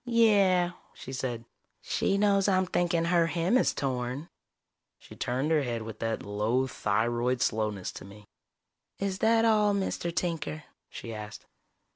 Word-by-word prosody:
"Yeah," 200 -7 +4 0.2
she 130 - -9
said. 125 -3 -3 0.3
"She 195 - 0
knows 200 -1 +3
I'm 185 -1 +3
thinking 175 -2 0
her 170 -1 +3
hem 170 +6 +1
is 255 - +4
torn." 130 +3 -3 0.7
She - - -14
turned 130 +6 -1
her 155 -2 +4
head 120 -4 -3
with 110 0 -8
that 115 -1 -2
low 105 +6 0
thyroid 120 +2 0
slowness 105 -5 -1
to - - -10
me. 105 +1 -14 0.7
"Is 195 -1 -2
that 225 0 +4
all, 210 -2 +4
Mr. 190 -3 -2
Tinker?" 165 -3 -3 0.3
she 115 - -7
asked. 105 0 -8
150 Hz, 145 wpm, -29 LUFS, 115-190 Hz, 0.7 s, Yeah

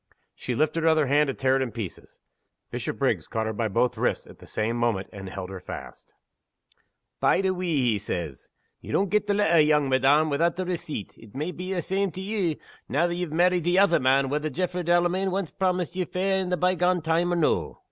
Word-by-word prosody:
She 125 - -4
lifted 155 +5 +1
her 165 - +4
other 155 -2 +3
hand 145 +2 +3
to 135 - -2
tear 130 0 +2
it - - -1
in 130 -3 -2
pieces. 105 -5 -8 0.5
Bishopriggs - - -1
caught 110 -1 -2
her 110 - -2
by 110 +1 -1
both 120 +4 0
wrists, - - 0
at - - -15
the - - -14
same 110 +2 -1
moment, 115 -5 0
and 95 -2 -7
held 95 0 -6
her 95 - -6
fast. 90 - -10 1.0
"Bide 195 - +3
a 190 - +2
wee!" 180 -3 -2 0.2
he 105 - 0
said. 85 -7 -3 0.5
"Ye - - -9
don't 195 -1 +1
get 210 0 +1
the 205 - +2
letter, 170 -5 +4
young 150 -2 +3
madam, 140 +4 +3
without 165 +4 +1
the 185 +1 -3
receipt. 160 - -4
It 110 -1 -16
may 155 +6 -2
be 180 +1 -6
a' - - -3
the 175 - 0
same 195 +3 0
to 190 - -6
you, 190 -5 -1 0.3
now 170 - +2
ye've 175 -2 -3
married 175 +2 +2
the 175 +2 +2
other 195 -3 +5
man, 135 +1 +3
whether 150 +2 -1
Jaffray 180 +4 -2
Delamayn 175 +3 +2
ance 195 -5 -3
promised 180 -2 -1
ye 185 - 0
fair 190 +3 0
in 185 - -3
the 180 - 0
by 180 +1 +2
gone 180 -1 +1
time, 165 +2 +1
or - - +1
no. 165 -3 0
165 Hz, 225 wpm, -26 LUFS, 130-180 Hz, 1.0 s, other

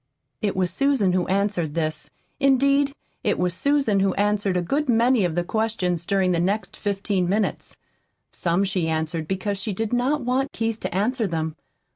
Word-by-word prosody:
It 205 -2 0
was 185 -2 0
Susan 275 -10 +2
who 180 -1 +1
answered 190 -5 0
this. 155 -2 -2 0.3
Indeed, 275 +1 +3 0.3
it - - +1
was 180 -1 0
Susan 275 -2 +2
who 195 -1 +1
answered 205 -2 +1
a - - +1
good 280 - -1
many 235 -1 +4
of 170 -3 0
the 175 - +1
questions 180 -5 -1
during 195 -2 +2
the 170 - +1
next 195 +2 -1
fifteen 200 -3 -1
minutes. 210 +2 -1 0.5
Some 175 +2 0
she 185 -4 0
answered 160 0 -2
because 190 +2 -2
she 200 +2 -3
did 220 +4 -3
not 265 +5 +1
want 255 +3 -1
Keith 225 -1 -2
to - - -4
answer 225 +3 +1
them. 160 -2 -2
200 Hz, 175 wpm, -24 LUFS, 180-235 Hz, 0.5 s, many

